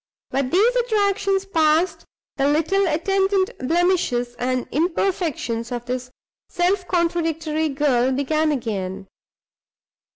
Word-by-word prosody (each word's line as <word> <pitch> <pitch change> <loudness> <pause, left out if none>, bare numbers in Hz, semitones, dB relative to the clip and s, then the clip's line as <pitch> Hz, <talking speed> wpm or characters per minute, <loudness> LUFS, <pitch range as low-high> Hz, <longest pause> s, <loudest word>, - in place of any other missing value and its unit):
But 270 -1 0
these 435 - +3
attractions 400 -4 +1
passed, 330 -1 +1 0.3
the 275 0 +2
little 330 +7 +2
attendant 385 +4 +1
blemishes 320 -5 +1
and 255 0 -1
imperfections 320 - -1
of 240 -1 -4
this 250 0 -4 0.4
self 360 +1 0
contradictory 325 -3 0
girl 270 -3 +1
began 305 +4 +1
again. 200 -7 -3
315 Hz, 100 wpm, -22 LUFS, 255-370 Hz, 0.4 s, these